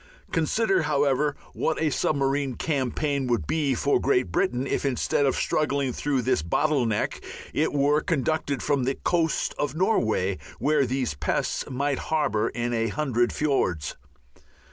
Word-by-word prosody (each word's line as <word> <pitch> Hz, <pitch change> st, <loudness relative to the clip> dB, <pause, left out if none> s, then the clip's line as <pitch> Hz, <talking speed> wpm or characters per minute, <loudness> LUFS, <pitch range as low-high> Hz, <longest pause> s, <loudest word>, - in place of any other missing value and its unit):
Consider, 195 Hz, +5 st, +2 dB
however, 145 Hz, -1 st, +1 dB, 0.2 s
what -, -, -1 dB
a 155 Hz, -2 st, +1 dB
submarine 140 Hz, -2 st, 0 dB
campaign 140 Hz, -1 st, -1 dB
would 120 Hz, -10 st, 0 dB
be 145 Hz, -, 0 dB
for 140 Hz, +4 st, +2 dB
Great 125 Hz, -9 st, +1 dB
Britain 125 Hz, +9 st, 0 dB
if -, -, -1 dB
instead 140 Hz, +1 st, +1 dB
of 135 Hz, -, +1 dB
struggling 140 Hz, -4 st, 0 dB
through 135 Hz, -2 st, -1 dB
this 130 Hz, -10 st, +1 dB
bottle 135 Hz, -, +1 dB
neck 110 Hz, -2 st, -1 dB, 0.3 s
it -, -, +1 dB
were 145 Hz, +1 st, +2 dB
conducted 150 Hz, -2 st, -1 dB
from 140 Hz, -3 st, +1 dB
the 135 Hz, +1 st, 0 dB
coast 165 Hz, -2 st, 0 dB
of 145 Hz, -, -1 dB
Norway, 110 Hz, -, +1 dB, 0.2 s
where 145 Hz, -2 st, +2 dB
these 130 Hz, -, -1 dB
pests 70 Hz, -, -2 dB
might 140 Hz, +1 st, -1 dB
harbour 130 Hz, -10 st, +1 dB
in 120 Hz, 0 st, -2 dB
a 115 Hz, -1 st, +1 dB
hundred 120 Hz, -1 st, 0 dB
fiords. 95 Hz, -, 0 dB
140 Hz, 145 wpm, -26 LUFS, 125-150 Hz, 0.3 s, Consider